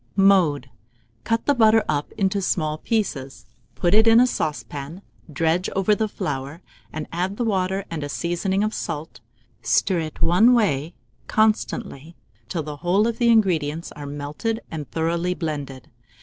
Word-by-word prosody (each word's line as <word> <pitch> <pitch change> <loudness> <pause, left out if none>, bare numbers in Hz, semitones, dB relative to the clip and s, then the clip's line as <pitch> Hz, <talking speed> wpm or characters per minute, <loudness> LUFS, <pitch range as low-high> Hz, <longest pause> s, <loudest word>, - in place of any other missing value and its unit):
Mode. 175 -10 +3 0.5
Cut 230 0 0
the 285 - +4
butter 225 -3 +5
up 145 -1 -1
into 195 -1 0
small 155 -4 -1
pieces, 155 - -2 0.3
put 175 -1 +1
it 220 +2 +6
in 225 +1 +7
a 250 - +6
saucepan, 155 - -4 0.3
dredge 165 +5 0
over 195 +2 +3
the 220 +1 0
flour, 145 -2 -5 0.3
and 155 -1 -5
add 185 +4 -2
the 245 - -1
water 190 -2 0
and 160 -3 -4
a 145 - -4
seasoning 180 +6 -1
of 215 +1 -1
salt; 155 +1 -5 0.4
stir 185 -3 +2
it 155 -2 -5
one 220 +9 +5
way 165 - 0 0.3
constantly 210 - 0 0.3
till 165 - -2
the 150 -1 -7
whole 180 +7 +2
of 230 -1 -2
the 235 -1 +3
ingredients 170 -8 +2
are 145 -1 -8
melted 145 +11 -3
and 155 -3 -6
thoroughly 170 +2 -1
blended. 145 -6 -5
175 Hz, 155 wpm, -23 LUFS, 150-210 Hz, 0.5 s, in